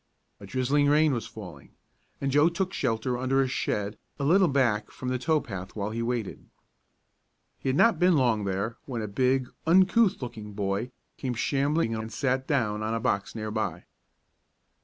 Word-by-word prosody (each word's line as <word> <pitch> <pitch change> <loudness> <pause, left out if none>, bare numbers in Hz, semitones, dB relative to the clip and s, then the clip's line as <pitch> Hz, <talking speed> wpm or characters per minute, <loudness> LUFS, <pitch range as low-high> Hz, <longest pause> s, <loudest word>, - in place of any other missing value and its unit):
A 100 - -11
drizzling 130 +6 +1
rain 150 0 +4
was 120 - -3
falling, 90 -10 -11 0.5
and 135 0 -1
Joe 145 +4 +5
took 185 +2 -2
shelter 125 0 -1
under 130 +1 +1
a - - -1
shed 105 -4 -2 0.2
a 140 - -3
little 180 +6 +5
back 120 -7 +1
from 130 - -6
the 130 0 -1
tow 155 +5 +2
path 95 -7 -7
while 105 0 -3
he 115 +1 -3
waited. 115 -3 -3 1.2
He - - -2
had 130 - +1
not 220 0 +4
been 180 -2 +4
long 120 -5 +2
there 100 +4 -2
when 120 -5 -3
a - - -3
big, 130 +4 +1 0.2
uncouth 190 +4 +4
looking 110 -4 -7
boy 100 +3 -2 0.3
came 125 -2 -3
shambling 140 +2 +1
in 110 -1 -2
and 110 0 -7
sat 130 -1 -1
down 110 -8 0
on 110 +1 -1
a - - -1
box 100 -3 -1
near 110 -1 -4
by. 110 0 -3
125 Hz, 180 wpm, -27 LUFS, 110-145 Hz, 1.2 s, Joe